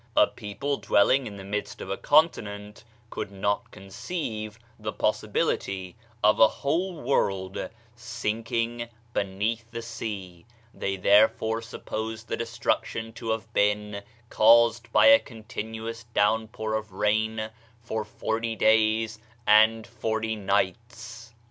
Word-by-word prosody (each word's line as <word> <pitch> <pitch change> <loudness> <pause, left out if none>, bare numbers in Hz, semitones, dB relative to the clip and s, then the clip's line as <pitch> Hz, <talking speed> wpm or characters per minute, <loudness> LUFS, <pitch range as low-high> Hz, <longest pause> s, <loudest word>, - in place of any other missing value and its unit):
A - - +8
people 115 +7 -4
dwelling 110 +5 +3
in 100 -2 -8
the 95 - -8
midst 105 +2 -4
of - - -6
a - - 0
continent 105 -10 +1 0.3
could - - -4
not 100 +1 -1
conceive 110 - -5 0.2
the 105 0 -3
possibility 100 -4 -1 0.3
of 105 0 +5
a 110 - +9
whole 165 - -2
world 95 -9 -1 0.3
sinking 115 0 -3 0.2
beneath 105 +4 -2
the 115 0 -6
sea; 105 -6 -6 0.3
they 95 - -2
therefore 110 +3 +3
supposed 110 0 -6
the - - 0
destruction 115 -1 -2
to 115 0 -6
have 110 0 -3
been 105 0 +1 0.3
caused 115 +1 +5
by - - +5
a 280 0 +9
continuous 110 0 -7
down 110 0 +1
pour 110 0 -4
of 110 -2 -3
rain 110 +2 0 0.3
for 110 -1 -3
forty 115 +2 -3
days 110 +1 +2 0.3
and 110 +1 +5
forty 110 -1 -2
nights. 115 +4 -2
110 Hz, 125 wpm, -26 LUFS, 105-115 Hz, 0.3 s, a